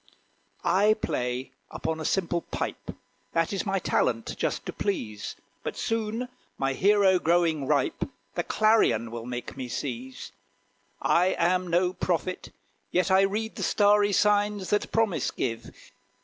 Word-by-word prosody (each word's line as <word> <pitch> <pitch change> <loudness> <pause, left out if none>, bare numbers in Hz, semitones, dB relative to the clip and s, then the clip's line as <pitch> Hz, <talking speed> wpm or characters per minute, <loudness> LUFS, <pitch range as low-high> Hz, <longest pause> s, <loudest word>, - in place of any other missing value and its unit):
I 205 +4 +4
play 125 -9 -3 0.2
upon 160 0 -3
a 155 - -4
simple 175 -1 0
pipe: - - -5 0.4
That 165 +3 +1
is 195 - -2
my 195 0 +1
talent 115 - 0
just - - -2
to - - -5
please; 110 - -3 0.3
But - - -5
soon 225 +2 -2 0.3
my 135 0 0
hero, 195 +3 +4
growing 165 -4 +2
ripe, - - 0 0.2
The - - 0
clarion 210 - +2
will 115 0 -6
make 125 0 -5
me 130 -2 -5
seize. 130 0 -5 0.7
I 180 +2 +3
am 180 +2 +2
no 180 +1 +2
prophet, 185 0 -2 0.4
yet 185 +2 +1
I 190 +1 +6
read 210 +3 -1
The - - -4
starry 205 0 +4
signs 205 -1 +2
that 205 - +1
promise 220 -6 +1
give. 115 -3 -3
180 Hz, 140 wpm, -27 LUFS, 135-205 Hz, 0.7 s, I